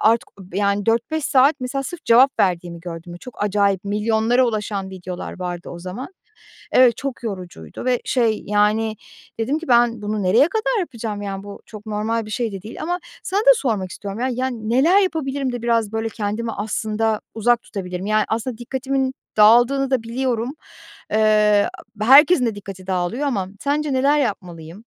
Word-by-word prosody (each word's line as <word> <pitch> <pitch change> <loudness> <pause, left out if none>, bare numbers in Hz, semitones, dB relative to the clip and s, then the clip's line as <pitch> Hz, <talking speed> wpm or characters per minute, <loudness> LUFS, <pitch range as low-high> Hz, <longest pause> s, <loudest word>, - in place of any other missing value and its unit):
artık, 225 +1 +3 0.3
yani, 200 0 0
4-5 235 +7 0
saat 275 +3 +4
mesela 265 +2 -3
sırf 335 +4 -8
cevap 255 +4 +5
verdiğimi 175 -2 0
gördüm. 175 0 -8
Çok 250 -4 -8
acayip 200 -2 +1
milyonlara 220 +4 +2
ulaşan 210 -3 -3
videolar 180 -1 -7
vardı 175 -1 -5
o 175 - -8
zaman. 185 +9 -7 0.6
Evet, 250 -3 +5
çok 275 -3 -5
yorucuydu 180 - -7
ve 250 -1 +1
şey, 230 -4 +1
yani, 210 +2 +1 0.4
dedim 270 +7 0
ki 330 - -9
ben 235 -2 +3
bunu 210 0 -2
nereye 225 - +4
kadar 455 +3 0
yapacağım, 225 - -5
yani, 195 -1 -5
bu 205 0 -10
çok 215 -1 -11
normal 220 +2 -1
bir - - -9
şey 225 0 -2
de 195 -2 -7
değil 215 +3 -8
ama 350 +2 -1 0.2
sana 390 +2 0
da - - +6
sormak 210 - -1
istiyorum, 200 +4 -7
ya, 255 - 0
yani, 245 -3 -3
neler 320 +11 +4
yapabilirim 280 -8 -1
de 245 - -5
biraz, 230 -3 +1
böyle, 225 0 -1
kendimi 220 +2 -3
aslında 215 +1 -1
uzak 235 +2 +2
tutabilirim? 180 -1 -6
Yani, 215 0 +2
aslında 230 +1 -3
dikkatimin 265 +2 -2 0.2
dağıldığını 240 +5 +5
da 260 -4 +1
biliyorum. 240 +1 -2 0.6
Eee, 210 -1 +4 0.3
herkesin 275 +3 +7
de 225 - -1
dikkati 195 -2 -9
dağılıyor 190 +10 -1
ama 200 -9 -1
sence 290 +1 -1
neler 275 +3 +3
yapmalıyım? 180 - -4
225 Hz, 165 wpm, -21 LUFS, 205-260 Hz, 0.6 s, herkesin